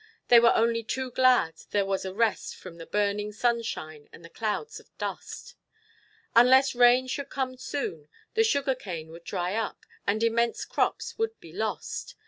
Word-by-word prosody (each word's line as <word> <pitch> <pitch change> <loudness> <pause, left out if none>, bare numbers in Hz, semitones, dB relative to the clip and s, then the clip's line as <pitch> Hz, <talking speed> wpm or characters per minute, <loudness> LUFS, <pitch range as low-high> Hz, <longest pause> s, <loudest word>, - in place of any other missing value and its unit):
They 240 - +9
were 235 0 +5
only 230 0 +2
too 255 +3 -4
glad 250 -11 +3
there 200 -1 +1
was 195 -1 -2
a 190 - -3
rest 225 +3 0
from 175 -3 -11
the 165 - -9
burning 205 0 0
sunshine 210 -10 -2
and 165 - -14
the 165 - -13
clouds 225 - -3
of - - -21
dust. - - -6 0.8
Unless 260 +3 +6
rain 245 +1 +5
should 270 +2 -4
come 260 -1 -2
soon, 165 - -5 0.2
the 445 0 +4
sugar 280 -11 +2
cane 170 -10 -7
would 170 +1 -12
dry 180 +1 -2
up 225 0 -3 0.2
and 215 +3 +1
immense 230 +1 +1
crops - - -1
would 450 0 -1
be - - -14
lost. - - -4
230 Hz, 170 wpm, -27 LUFS, 195-255 Hz, 0.8 s, They